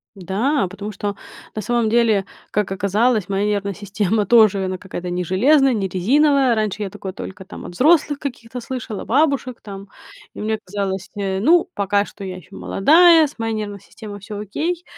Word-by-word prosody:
Да, 195 - 0
потому 200 +3 -7
что, 205 0 -4 0.4
на 215 - -3
самом 235 0 0
деле, 220 -4 +3 0.2
как 210 -2 -1
оказалось, 205 +2 +1
моя 195 +1 0
нервная 200 -1 -1
система 205 +1 -1
тоже 205 -3 +5
она, 185 0 -3
какая-то 180 -2 -6
не 180 0 -1
железная, 265 - +3
не 195 -3 -1
резиновая. 265 - +3
Раньше 215 -1 -2
я 200 - -2
такое 190 0 -7
только 190 -1 -8
там - - -10
от 175 - -8
взрослых 295 - +3
каких-то 245 -3 -6
слышала, 235 -4 -6
бабушек 270 -2 +1
там, 195 -1 -9 0.4
и - - -8
мне 220 +1 -1
казалось, 195 0 -3
э, 195 -2 -2
ну 335 - +4
пока 200 0 +1
что 200 - -11
я 185 -1 -6
еще 180 - -14
молодая 325 - +5
с 285 - -15
моей 225 0 -2
нервной 205 -2 -4
системой 205 +1 -10
всё 205 +1 -7
окей. 325 - -3
210 Hz, 180 wpm, -20 LUFS, 195-250 Hz, 0.4 s, тоже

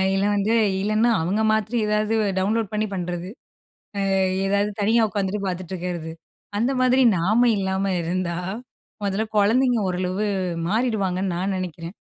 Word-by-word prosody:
இல்ல 195 +1 +1
வந்து 205 +2 +1 0.3
இல்லன்னா, 215 +3 +2
அவுங்க 190 +7 0
மாத்ரி 220 +2 0
ஏதாது 210 +1 +1 0.3
டவுன்லோட் 210 +2 0
பண்ணி 215 0 0
பண்றது. 180 -1 -4 0.8
ஆ - - +2 0.3
ஏதாது 200 +1 +1
தனியா 225 +2 +3
உக்காந்துட்டு 200 0 -2
பாத்துட்டு 185 0 -4
இருக்கிறது. 175 -2 -4 0.5
அந்த 235 +5 +1
மாதிரி 255 +1 +4
நாம 215 +8 +3
இல்லாம 190 0 -1
இருந்தா, 170 0 -2 0.7
முதல்ல 200 +2 0
குழந்தைங்க 240 +4 +3
ஓரளவு 185 +3 -1 0.4
மாறிடுவாங்கன்னு 195 -4 0
நான் 190 +2 -1
நெனைக்கிறேன். 175 -1 -6
195 Hz, 130 wpm, -23 LUFS, 185-215 Hz, 0.8 s, மாதிரி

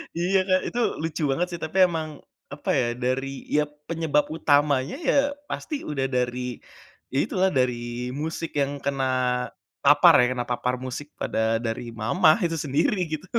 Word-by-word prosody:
Iya, 180 +3 +2
Kak. 185 -1 +4
Itu 240 - -3 0.2
lucu 160 0 -3
banget 175 +6 0
sih, 170 - -5
tapi, 160 +5 -4
emang, 160 -2 -3 0.4
apa, 145 +1 -7
ya, 125 - +2 0.2
dari 130 +2 0 0.2
iya 150 0 +3 0.3
penyebab 160 -3 +1
utamanya 145 - +2
ya - - +4 0.4
pasti 310 - -4
udah 135 -3 -1
dari 125 0 0 0.7
ya - - 0
itulah 190 0 +1
dari 125 -1 +3 0.5
musik 160 +1 -4
yang 140 0 0
kena 135 -1 0 0.8
papar 145 +4 +7
ya, - - +4
kena 125 -1 -2
papar 125 +1 0
musik 130 +3 -5
pada - - -2 0.3
dari 115 +1 -2 0.2
mama 155 - +4
itu 165 - -1
sendiri 150 +8 +1
gitu. 155 +4 -4
145 Hz, 155 wpm, -25 LUFS, 130-165 Hz, 0.8 s, papar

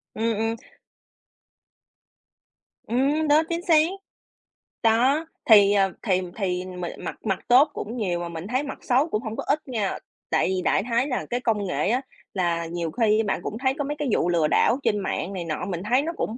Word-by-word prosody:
Ừm, 225 +1 0
ừm. 225 +1 0 2.3
Ừm, 280 +6 +1
đó, 300 +2 +5
chính 335 +1 -1
xác. 325 - +6 1.1
Đó, 255 +8 +3 0.2
thì, 205 -2 +8
ờ, 195 -2 +3
thì 185 -4 +2 0.2
thì 180 -2 -1
m 180 -1 -8 0.2
mặt - - -6
mặt 195 -3 0
tốt 270 +5 +6
cũng 230 +4 -5
nhiều 180 -6 -1
mà 170 0 -4
mình 170 +3 -7
thấy 255 +5 0
mặt 280 - -6
xấu 260 +6 +2
cũng 215 - -1
hông 220 0 -5
có - - -4
ít 300 +2 +2
nha. 220 -6 -2 0.3
Tại - - +2
vì 185 -1 -1
đại 195 - +1
khái 240 +4 +1
là 250 - -2
cái 245 - -1
công 215 -5 0
nghệ 180 - 0
á 250 +4 +1 0.3
là 170 -3 0
nhiều 165 -1 -4
khi 220 -2 +2
bạn 205 - -1
cũng 220 - -4
thấy 260 +1 +1
có 285 - -1
mấy 295 +2 -3
cái 295 - -2
vụ 175 - +2
lừa 165 -3 +2
đảo 240 - +3
trên 210 - +1
mạng 195 0 -3
này 180 -2 -4
nọ, 160 +2 -3
mình 180 -3 -4
thấy 255 +3 +4
nó 330 +3 -3
cũng 230 - -3
220 Hz, 205 wpm, -24 LUFS, 185-255 Hz, 2.3 s, thì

